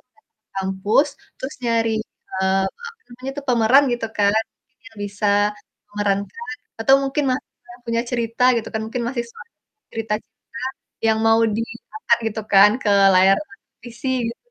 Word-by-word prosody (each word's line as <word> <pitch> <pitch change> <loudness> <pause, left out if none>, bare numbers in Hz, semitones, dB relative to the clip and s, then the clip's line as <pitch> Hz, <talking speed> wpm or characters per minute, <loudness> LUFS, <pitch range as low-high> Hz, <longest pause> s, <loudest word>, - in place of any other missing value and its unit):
ke - - -28 0.4
kampus, 195 +8 +1 0.3
terus 265 +2 -5
nyari, 230 -1 +1 0.4
eee, 190 0 +2 0.2
apa 465 -1 -11
namanya 255 +2 -7
tuh, 285 - -6
pemeran, 245 +3 +5
gitu 240 -1 -2
kan, 200 -1 +4 0.3
mungkin 255 -1 -51
yang 225 - -18
bisa 205 +1 -3 0.6
memerankan 205 - -2 0.3
atau 265 +4 +6
mungkin 275 +2 -1
mahasiswa 255 +2 -6
yang 245 - -19
punya 230 0 0
cerita 235 -1 -2
gitu 230 - -2
kan, 220 - -2
mungkin 240 +2 -3
masih 240 -1 -2
soal - - -13 0.5
cerita 225 -1 -3
cinta - - -53 0.6
yang 220 0 +3
mau 225 0 +5 0.2
di - - 0 0.3
angkat 255 - +2
gitu 220 0 -5
kan, 200 +1 +8
ke - - 0 0.3
layar 190 +1 +6
televisi 235 +1 -10 0.2
gitu 235 - -6
230 Hz, 155 wpm, -21 LUFS, 205-255 Hz, 0.6 s, kan